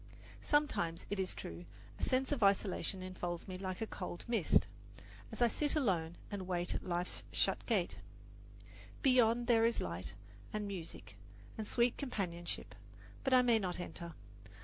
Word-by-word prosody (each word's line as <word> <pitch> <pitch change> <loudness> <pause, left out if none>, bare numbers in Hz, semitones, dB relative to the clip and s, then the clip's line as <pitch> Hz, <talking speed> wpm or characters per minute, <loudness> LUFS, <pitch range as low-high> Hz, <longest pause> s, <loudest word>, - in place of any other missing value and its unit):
Sometimes, 290 - +1
it 205 - -1
is 190 -1 0
true, 85 +1 -6 0.4
a - - -6
sense 260 +1 +2
of 285 -5 0
isolation 195 -1 +2
enfolds 175 -2 -4
me 185 - -5
like 185 +1 -4
a - - +1
cold 180 -4 -6
mist 230 -7 +3 0.7
as - - +1
I - - +7
sit 295 +6 +1
alone 175 - +1 0.2
and 195 -3 -4
wait 175 -1 0
at - - -3
life's 175 0 -1
shut - - +2
gate. - - +1 1.0
Beyond 240 -3 +5
there 230 -1 +5
is 230 +1 +3
light, 90 +2 -4 0.4
and 210 -1 -2
music, 160 - -7 0.4
and 215 -1 -4
sweet 240 +1 +2
companionship; 180 -10 -3 0.5
but 270 - +1
I 255 -1 +7
may 235 -2 +5
not 180 -3 -1
enter. 170 -2 -6
195 Hz, 155 wpm, -36 LUFS, 175-235 Hz, 1.0 s, I